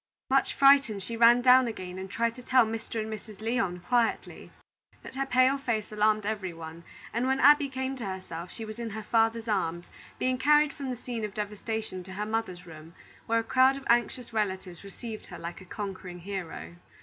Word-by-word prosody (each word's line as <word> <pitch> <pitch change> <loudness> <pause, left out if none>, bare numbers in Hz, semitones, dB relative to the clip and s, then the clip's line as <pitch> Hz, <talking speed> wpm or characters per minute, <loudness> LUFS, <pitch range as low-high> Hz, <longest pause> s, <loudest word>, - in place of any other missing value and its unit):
Much 270 0 +2
frightened, 275 -8 +5
she 230 +5 -4
ran 235 +1 +6
down 255 0 +7
again 185 -5 -6
and 190 0 -7
tried 230 +3 0
to 250 - -10
tell 255 -1 +4
Mr. 225 +1 -4
and 220 0 -3
Mrs. 215 -1 -10
Lyon 205 -6 -1
quietly. 235 +5 -1 0.5
But - - -10
her 270 +1 -2
pale 260 +2 +3
face 220 -6 -2
alarmed 215 0 +2
every 200 -4 -3
one, 165 0 -9 0.3
and 240 +3 0
when 265 0 +1
Abby 290 +1 +6
came 265 0 -3
to 235 - -5
herself, 180 -2 -6
she 225 - -6
was 215 +1 -8
in 235 -1 -4
her 220 +1 -6
father's 225 0 +1
arms, 175 -5 -1 0.3
being 255 0 0
carried 295 +1 +4
from 275 -2 -6
the 250 - -3
scene 235 -2 -5
of 210 -2 -5
devastation 210 -1 -4
to 190 - -9
her 205 +2 -3
mother's 215 -5 -3
room, 160 0 -12 0.3
where 230 - +2
a 230 - +1
crowd 260 +3 +4
of 275 - -10
anxious 240 0 +1
relatives 190 -5 -3
received 215 +2 -8
her - - -9
like 170 +2 -7
a - - -12
conquering 185 -3 -7
hero. 180 -2 -6
220 Hz, 200 wpm, -28 LUFS, 190-250 Hz, 0.5 s, down